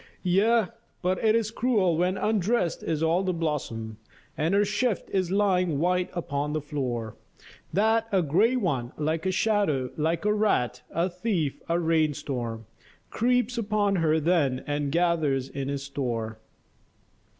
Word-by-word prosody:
Yea, 210 Hz, +5 st, +3 dB, 0.4 s
but 185 Hz, +3 st, 0 dB
it 220 Hz, 0 st, +4 dB
is 220 Hz, -2 st, 0 dB
cruel 215 Hz, -8 st, +2 dB
when 180 Hz, +3 st, +1 dB
undressed 210 Hz, -3 st, 0 dB
is 160 Hz, -1 st, -1 dB
all 165 Hz, +3 st, +2 dB
the 190 Hz, -1 st, 0 dB
blossom, 115 Hz, -9 st, -3 dB, 0.4 s
And 160 Hz, +6 st, +1 dB
her 205 Hz, +1 st, +4 dB
shift 210 Hz, +2 st, -1 dB
is 185 Hz, -3 st, 0 dB
lying 185 Hz, -5 st, +2 dB
white 180 Hz, +3 st, +1 dB
upon 150 Hz, -4 st, -2 dB
the 155 Hz, -, 0 dB
floor, 125 Hz, -7 st, -4 dB, 0.5 s
That 220 Hz, +4 st, +2 dB
a 190 Hz, -3 st, +3 dB
grey 195 Hz, -, +3 dB
one, 140 Hz, -, -1 dB
like 160 Hz, +3 st, -1 dB
a -, -, +2 dB
shadow, 185 Hz, -, +1 dB
like 160 Hz, +4 st, 0 dB
a 210 Hz, -, +3 dB
rat, 165 Hz, -, +1 dB
a 170 Hz, +2 st, 0 dB
thief, 180 Hz, -5 st, -2 dB
a 170 Hz, +1 st, +2 dB
rain 160 Hz, -3 st, +2 dB
storm 115 Hz, -5 st, -4 dB, 0.5 s
Creeps 245 Hz, 0 st, +1 dB
upon 205 Hz, -2 st, +1 dB
her 160 Hz, -2 st, +2 dB
then 150 Hz, -6 st, +1 dB
and 145 Hz, -1 st, -2 dB
gathers 155 Hz, -6 st, +1 dB
in 135 Hz, -1 st, -4 dB
his 140 Hz, 0 st, -3 dB
store. 115 Hz, -6 st, -3 dB
170 Hz, 150 wpm, -27 LUFS, 145-205 Hz, 0.5 s, it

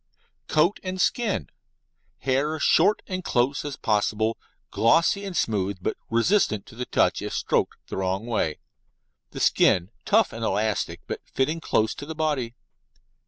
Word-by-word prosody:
COAT 165 Hz, +6 st, +2 dB
AND 185 Hz, 0 st, -4 dB
SKIN 225 Hz, +1 st, 0 dB, 0.7 s
Hair 140 Hz, +4 st, 0 dB
short 195 Hz, +7 st, +3 dB
and 185 Hz, -1 st, -4 dB
close 130 Hz, +1 st, +1 dB
as 145 Hz, -2 st, -4 dB
possible, 110 Hz, +2 st, 0 dB, 0.4 s
glossy 165 Hz, -, +3 dB
and 190 Hz, -4 st, -4 dB
smooth, 100 Hz, -3 st, 0 dB
but 95 Hz, -, -2 dB
resistant 115 Hz, -, +2 dB
to -, -, -15 dB
the 125 Hz, +2 st, -5 dB
touch -, -, +2 dB
if -, -, -4 dB
stroked -, -, 0 dB
the -, -, -6 dB
wrong 95 Hz, +2 st, -1 dB
way. 105 Hz, -10 st, -1 dB, 0.7 s
The -, -, -8 dB
skin 90 Hz, +3 st, +3 dB
tough 220 Hz, 0 st, +3 dB
and 115 Hz, 0 st, -6 dB
elastic, 110 Hz, -1 st, -1 dB
but -, -, -5 dB
fitting 155 Hz, +5 st, -1 dB
close 110 Hz, -7 st, +1 dB
to 145 Hz, -, -9 dB
the 160 Hz, -, -5 dB
body. 145 Hz, -7 st, -1 dB
130 Hz, 150 wpm, -25 LUFS, 110-165 Hz, 0.7 s, short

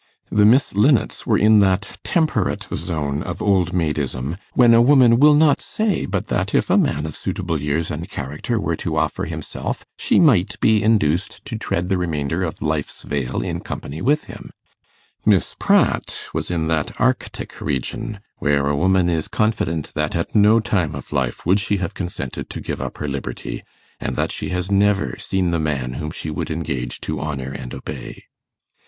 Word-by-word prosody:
The 105 Hz, 0 st, +5 dB
Miss 125 Hz, +6 st, +4 dB
Linnets 115 Hz, +6 st, +2 dB
were -, -, +4 dB
in 105 Hz, 0 st, +6 dB
that 95 Hz, -2 st, +1 dB
temperate 155 Hz, -, 0 dB
zone 75 Hz, -4 st, -2 dB
of -, -, -5 dB
old 95 Hz, -4 st, +2 dB
maidism, 75 Hz, -2 st, -2 dB, 0.2 s
when 120 Hz, -2 st, +6 dB
a 115 Hz, -, +7 dB
woman 125 Hz, -2 st, +6 dB
will 150 Hz, +1 st, +7 dB
not 150 Hz, -1 st, +4 dB
say 215 Hz, -2 st, -1 dB
but -, -, -2 dB
that -, -, 0 dB
if -, -, +2 dB
a -, -, +5 dB
man 75 Hz, +2 st, 0 dB
of 80 Hz, -, -5 dB
suitable 85 Hz, -6 st, -3 dB
years 75 Hz, +3 st, -1 dB
and 80 Hz, +3 st, -5 dB
character 75 Hz, -, -3 dB
were 85 Hz, -4 st, -1 dB
to 80 Hz, -3 st, -3 dB
offer 80 Hz, 0 st, 0 dB
himself, -, -, -5 dB
she -, -, +3 dB
might 115 Hz, -, +3 dB
be 110 Hz, -2 st, +4 dB
induced 100 Hz, -5 st, +1 dB
to -, -, -5 dB
tread 90 Hz, -5 st, -2 dB
the 95 Hz, -2 st, +1 dB
remainder 80 Hz, -1 st, -1 dB
of 80 Hz, -, -4 dB
life's 75 Hz, -1 st, -2 dB
vale 70 Hz, -4 st, -2 dB
in -, -, -3 dB
company 75 Hz, +4 st, -6 dB
with 145 Hz, +8 st, +2 dB
him; -, -, -10 dB, 0.7 s
Miss -, -, +2 dB
Pratt -, -, +2 dB, 0.2 s
was -, -, -3 dB
in 85 Hz, -2 st, -1 dB
that 80 Hz, -2 st, -1 dB
arctic -, -, -1 dB
region 75 Hz, -, -3 dB, 0.2 s
where 70 Hz, -1 st, +2 dB
a 75 Hz, -, +1 dB
woman 95 Hz, +3 st, +3 dB
is 80 Hz, -3 st, 0 dB
confident 85 Hz, -8 st, -1 dB
that 75 Hz, +2 st, -1 dB
at 85 Hz, -, -2 dB
no 105 Hz, +1 st, +6 dB
time 90 Hz, -10 st, 0 dB
of 70 Hz, +1 st, -8 dB
life 65 Hz, -4 st, -1 dB
would 95 Hz, +5 st, +4 dB
she 105 Hz, 0 st, 0 dB
have 95 Hz, -3 st, -3 dB
consented 85 Hz, -8 st, -5 dB
to -, -, -6 dB
give -, -, -4 dB
up -, -, -5 dB
her 75 Hz, -, -4 dB
liberty, 70 Hz, -1 st, -5 dB, 0.4 s
and -, -, -3 dB
that -, -, 0 dB
she -, -, -4 dB
has 90 Hz, +1 st, -2 dB
never 100 Hz, -10 st, +2 dB
seen 95 Hz, -2 st, 0 dB
the 85 Hz, -, 0 dB
man 70 Hz, -5 st, -1 dB
whom 75 Hz, +3 st, -4 dB
she 80 Hz, -1 st, -5 dB
would 75 Hz, -, -3 dB
engage 75 Hz, -6 st, -3 dB
to -, -, -3 dB
honour 70 Hz, -4 st, -4 dB
and 65 Hz, -2 st, -7 dB
obey. 65 Hz, -, -8 dB
85 Hz, 185 wpm, -21 LUFS, 75-105 Hz, 0.7 s, a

